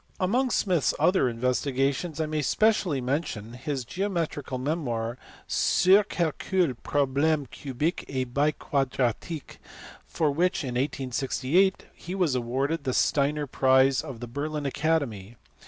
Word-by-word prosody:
Among 245 +8 +1
Smith 185 -7 +2
s - - +3
other 180 -9 +3
investigations 135 +6 -1
I 160 - +1
may 155 0 -1
specially 185 -3 +2
mention 125 -5 -3
his 130 0 -4
geometrical 165 - -3
memoir 125 -5 -2 0.3
Sur 190 +3 +4
quelques 175 -4 0
problemes 145 0 +1
cubiques 145 +5 -3
el 130 -1 -1
biquadratiques, 140 +1 -1 0.5
for 155 -3 0
which 175 +4 +1
in 130 - -3
1868 135 +7 0
he 180 +2 -7
was 180 -7 +1
awarded 135 +6 -1
the 130 -2 -1
Steiner 145 +1 +2
prize 130 0 +3
of 135 -7 -8
the 120 - -5
Berlin 145 +4 -4
Academy. 135 -8 -1
140 Hz, 125 wpm, -27 LUFS, 130-165 Hz, 0.5 s, Sur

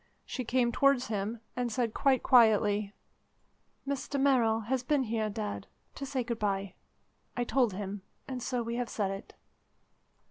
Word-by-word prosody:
She 255 - -4
came 240 0 +2
towards 275 -1 +3
him, 215 +2 -2
and 245 -1 -1
said 230 -1 -1
quite 270 -2 +2
quietly: 210 -4 +4 1.0
"Mr 280 0 -2
Merrill 240 -5 +3
has 250 +4 -1
been 275 +2 +1
here, 220 -2 -1
Dad, 210 -1 -4 0.3
to 275 - -6
say 260 -2 -1
good 235 -1 -4
bye. 195 -2 -1 0.6
I 245 - +1
told 240 -3 +2
him, 200 +1 -5 0.3
and 255 -2 -4
so 245 0 -1
we 235 +1 -3
have 245 -1 -2
said 200 -3 -1
it." 195 0 -8
235 Hz, 155 wpm, -30 LUFS, 210-255 Hz, 1.0 s, quietly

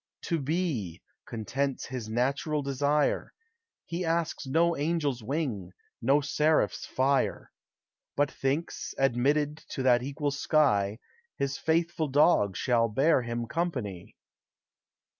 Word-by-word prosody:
To 165 -2 -1
Be, 140 - -2 0.3
contents 135 +5 -2
his 125 -4 -6
natural 140 +6 0
desire; 145 +2 +1 0.5
He 170 +2 -3
asks 165 -3 -1
no 165 +5 +3
angel's 145 -4 -1
wing, 110 - -3 0.3
no 135 +5 +3
seraph's 150 +2 +1
fire; 135 +1 0 0.6
But 145 0 +1
thinks, 140 +5 -2
admitted 140 +3 +2
to 130 - -3
that 125 -2 +4
equal 140 +2 -2
sky, 130 -9 +2 0.4
His 140 0 -2
faithful 165 0 +1
dog 135 - +3
shall 115 -2 +2
bear 135 +6 +3
him 120 0 -3
company. 125 - -3
140 Hz, 110 wpm, -28 LUFS, 120-155 Hz, 0.6 s, that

